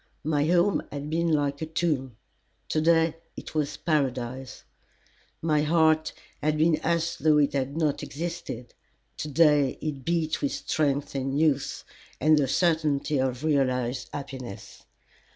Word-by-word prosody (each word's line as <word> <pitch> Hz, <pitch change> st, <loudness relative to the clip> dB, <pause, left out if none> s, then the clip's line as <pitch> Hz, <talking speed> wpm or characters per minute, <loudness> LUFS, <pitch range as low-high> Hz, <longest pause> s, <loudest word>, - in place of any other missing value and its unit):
My 150 Hz, -1 st, +1 dB
home 175 Hz, +4 st, +3 dB
had 145 Hz, +1 st, -5 dB
been 165 Hz, +1 st, +1 dB
like 145 Hz, -1 st, 0 dB
a 160 Hz, -, -2 dB
tomb; 145 Hz, -8 st, -1 dB, 0.5 s
to 155 Hz, -, +1 dB
day 165 Hz, 0 st, +3 dB, 0.2 s
it -, -, -8 dB
was 150 Hz, -2 st, -1 dB
Paradise. 130 Hz, -4 st, -2 dB, 0.8 s
My 155 Hz, -2 st, +2 dB
heart 160 Hz, 0 st, +3 dB, 0.3 s
had 155 Hz, +1 st, +1 dB
been 160 Hz, 0 st, +3 dB
as 170 Hz, +1 st, -1 dB
though 155 Hz, +1 st, +3 dB
it 145 Hz, -1 st, +3 dB
had 140 Hz, +2 st, -2 dB
not 155 Hz, -3 st, 0 dB
existed; 160 Hz, -6 st, -6 dB, 0.4 s
to -, -, -4 dB
day 150 Hz, -2 st, +3 dB
it 145 Hz, -4 st, -4 dB
beat 165 Hz, -1 st, 0 dB
with 285 Hz, -, 0 dB
strength 145 Hz, -2 st, -1 dB
and 135 Hz, +1 st, -1 dB
youth 150 Hz, -4 st, +1 dB, 0.4 s
and 155 Hz, +3 st, +5 dB
the 145 Hz, -3 st, +2 dB
certainty 155 Hz, -2 st, +1 dB
of 130 Hz, +1 st, -1 dB
realized 130 Hz, -4 st, 0 dB
happiness. 130 Hz, -6 st, -8 dB
150 Hz, 140 wpm, -27 LUFS, 135-160 Hz, 0.8 s, and